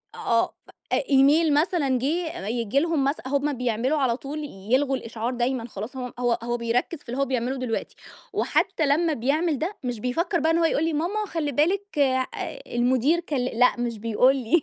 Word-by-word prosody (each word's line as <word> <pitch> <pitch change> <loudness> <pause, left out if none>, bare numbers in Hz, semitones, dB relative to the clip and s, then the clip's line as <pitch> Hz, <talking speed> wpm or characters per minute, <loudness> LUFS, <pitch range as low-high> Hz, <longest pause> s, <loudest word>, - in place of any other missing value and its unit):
أ - - -11
آه. 230 0 +1 0.4
أ - - +2
إيميل 290 +3 +5
مثلًا 290 -4 +2
جِه 320 - -2
م - - -6
ييجي 230 +3 0
لهم 325 -2 +1
مث 275 +2 +1
هم 285 +2 0
بيعملوا 250 +3 0
على 255 -5 +1
طول 295 +3 -6 0.3
يلغوا 270 +1 +3
الإشعار 230 0 -4
دايمًا 245 -1 -1
خلاص 220 +4 -7
هو 250 -2 -5
هو 245 -1 +2
هو 240 0 -1
بيركّز 235 +7 -1
في 280 - -17
اللي 250 +3 -3
هو - - +3
بيعمله 255 0 -1
دلوقتي، 250 -3 -3 0.4
وحتّى 315 - +1
لمّا 315 +3 +2
بيعمل 295 +4 0
ده، 365 +6 -3
مش 245 -3 -3
بيفكّر 335 - 0
بقى 320 +1 +2
إن 325 - +2
هو 335 - +3
يقول 315 -1 +1
لي، 325 0 0
ماما 365 +8 -1
خلّي 320 -6 -2
بالِك 360 +6 0
آآ 260 -2 +2 0.4
المدير 255 +6 +2
كل 310 -5 -3
لأ، 245 0 +2
مش 240 -2 -2
بيقول 230 +5 +3
لي. 270 +6 +2
270 Hz, 195 wpm, -25 LUFS, 245-315 Hz, 0.4 s, إيميل